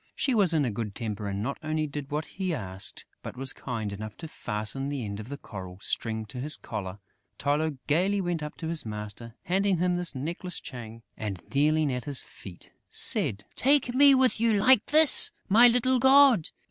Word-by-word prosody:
She 270 - -1
was 200 -7 +3
in 155 -4 +1
a 120 - -2
good 105 -1 -5
temper 105 -3 -5
and 100 +1 -4
not 140 +4 -4
only 155 0 -2
did 145 -1 -7
what 150 +1 -3
he 185 -3 -4
asked, 95 -5 -5 0.2
but - - -9
was 135 +1 -1
kind 110 -5 -5
enough 105 +1 -8
to 160 - -8
fasten 110 +2 -4
the 140 -5 -4
end 100 0 -6
of 110 +3 -9
the 140 - -6
coral 95 -8 -10
string 110 +2 -3
to 115 +4 -10
his 150 +4 -3
collar. 95 -1 -7 0.4
Tylô 145 +1 -1
gaily 185 +7 +1
went 175 -3 -2
up 150 0 -7
to 160 - -6
his 165 -1 -2
master, 105 +1 -7
handed 190 +1 0
him 180 +1 0
this 175 -4 +1
necklace 170 +6 -5
chain 115 -3 -10
and, 100 -4 -6
kneeling 150 0 +2
at 125 -1 -5
his 140 -3 +3
feet, 90 -3 -14 0.2
said: 100 0 +3
"Take 270 -2 +2
me 280 +1 +6
with 260 -3 +2
you 230 0 +2
like 210 +3 +4
this, 310 0 +8 0.2
my 230 +5 +6
little 250 +2 +2
god! 265 - +5
145 Hz, 200 wpm, -27 LUFS, -, 0.4 s, this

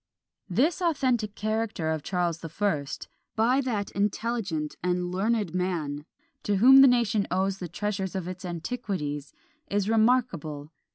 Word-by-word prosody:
" - - -48
This 320 +7 +2
authentic 255 - +1
character 215 -6 -1
of 160 -1 -2
Charles 175 -1 -1
the 165 - -7
First, 160 -6 -2 0.3
by 245 +5 +3
that 215 -7 -2
intelligent 200 -6 -1
and 180 0 -1
learned 205 0 0
man, 160 -6 -2 0.4
to 205 - 0
whom 265 +7 +8
the 270 - +9
nation 230 -5 +2
owes 190 +1 0
the 180 - -4
treasures 195 +1 -3
of 185 -2 -3
its 185 0 -7
antiquities, 175 - -4 0.4
is 200 -1 0
remarkable. 215 - +1
195 Hz, 145 wpm, -27 LUFS, 170-225 Hz, 0.4 s, the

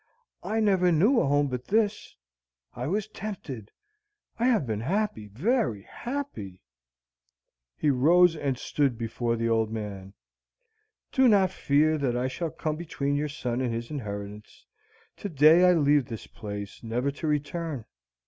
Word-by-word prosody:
I 220 - -1
never 190 -4 +3
knew 210 - +4
a - - +1
home 145 +1 +3
but 125 -1 -4
this. 210 -1 0 0.6
I 125 +3 -4
was 205 +5 -1
tempted. 170 - -7 0.7
I 235 - +2
have 230 - +3
been 110 -3 -2
happy, 155 - -1
very 135 - 0
happy." 235 - -6 1.1
He 150 - +2
rose 165 +6 +5
and 140 -4 -2
stood 140 -3 0
before 115 +1 -2
the 115 0 -1
old 110 -1 +2
man. 100 -3 -6 1.0
"Do 265 -1 +4
not 195 -5 +4
fear 155 +2 +2
that 125 -4 0
I 125 +1 0
shall 165 +5 -3
come 155 0 -3
between 145 -4 -2
your 150 +1 -1
son 125 -4 -3
and 125 -2 -1
his 115 +4 -4
inheritance. 105 -5 -7 0.5
To 205 - -5
day 160 +4 +6
I - - +6
leave 145 -4 +3
this 115 -4 -7
place, 100 -1 -7
never 125 +4 -1
to 155 +3 -5
return. 150 -3 -2
145 Hz, 150 wpm, -27 LUFS, 115-180 Hz, 1.1 s, day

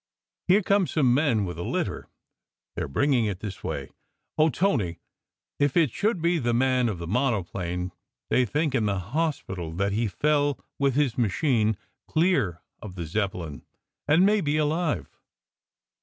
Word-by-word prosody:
"Here 195 +3 +5
come 200 -1 +3
some 130 -6 +2
men 125 -7 +2
with 90 -2 -6
a - - -3
litter. - - -2 0.7
They - - -3
re - - -3
bringing 130 - +2
it 100 -4 -2
this 105 -2 -7
way. - - -4 0.4
Oh, 155 +1 +4
Tony, 125 - 0 0.6
if 145 +1 +2
it 160 -7 +4
should 205 - 0
be 170 0 +2
the 120 -3 0
man 125 -1 +2
of 100 - -3
the 85 - -6
monoplane! 90 -5 -1 0.4
They 130 - +4
think 150 +4 0
in 115 -5 +1
the 100 -1 0
hospital 95 - -2
that 100 +3 0
he 110 +3 0
fell 145 +5 +1 0.2
with 140 -2 +2
his 135 -5 +1
machine 110 - +2 0.3
clear 155 - +1 0.2
of 100 -4 -8
the 85 -3 -4
Zeppelin, 85 - -3 0.4
and 160 +6 +5
may 210 +1 +3
be 150 -1 0
alive." 155 +1 -1
125 Hz, 160 wpm, -26 LUFS, 100-150 Hz, 0.7 s, Here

